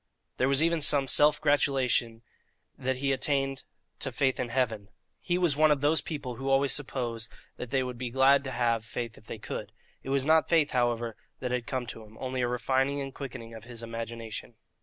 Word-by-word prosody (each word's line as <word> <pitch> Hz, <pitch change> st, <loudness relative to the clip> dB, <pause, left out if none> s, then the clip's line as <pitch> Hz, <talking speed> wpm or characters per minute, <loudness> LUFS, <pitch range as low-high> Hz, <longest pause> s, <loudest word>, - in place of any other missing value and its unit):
There 130 Hz, -, +2 dB
was 140 Hz, +3 st, +3 dB
even 165 Hz, -1 st, +2 dB
some 140 Hz, -2 st, +5 dB
self 150 Hz, +2 st, +5 dB
gratulation 130 Hz, -5 st, +1 dB, 0.5 s
that 130 Hz, +1 st, -1 dB
he 135 Hz, +2 st, 0 dB
had 135 Hz, -, 0 dB
attained 135 Hz, -1 st, +1 dB, 0.4 s
to -, -, +1 dB
faith 130 Hz, -3 st, +1 dB
in 120 Hz, -, -2 dB
Heaven. 115 Hz, -5 st, -1 dB, 0.3 s
He 175 Hz, -1 st, -1 dB
was 175 Hz, -5 st, +2 dB
one 155 Hz, +1 st, +5 dB
of 145 Hz, -2 st, +2 dB
those 150 Hz, +2 st, +3 dB
people 140 Hz, -7 st, -5 dB
who 135 Hz, +1 st, -3 dB
always 135 Hz, 0 st, +3 dB
suppose 120 Hz, -5 st, -2 dB, 0.3 s
that 125 Hz, -, -6 dB
they 130 Hz, +1 st, +1 dB
would 125 Hz, -2 st, -6 dB
be 125 Hz, -1 st, -3 dB
glad 135 Hz, +2 st, +4 dB
to 130 Hz, -, -3 dB
have 115 Hz, -3 st, +1 dB
faith 115 Hz, +1 st, -5 dB
if 110 Hz, -, -22 dB
they -, -, -6 dB
could. 105 Hz, -, -6 dB, 0.3 s
It -, -, -8 dB
was 135 Hz, -1 st, +1 dB
not 160 Hz, +1 st, +4 dB
faith, 160 Hz, -3 st, +3 dB
however, 120 Hz, -3 st, 0 dB, 0.2 s
that 125 Hz, -1 st, -3 dB
had 125 Hz, -2 st, -2 dB
come 130 Hz, -2 st, -2 dB
to 115 Hz, -, -8 dB
him, 110 Hz, 0 st, -16 dB
only 130 Hz, -1 st, -3 dB
a 120 Hz, -, +1 dB
refining 135 Hz, +3 st, 0 dB
and 135 Hz, -1 st, -5 dB
quickening 115 Hz, -4 st, -8 dB
of 110 Hz, 0 st, -10 dB
his 120 Hz, -1 st, -9 dB
imagination. 115 Hz, 0 st, -6 dB
130 Hz, 210 wpm, -29 LUFS, 115-140 Hz, 0.5 s, some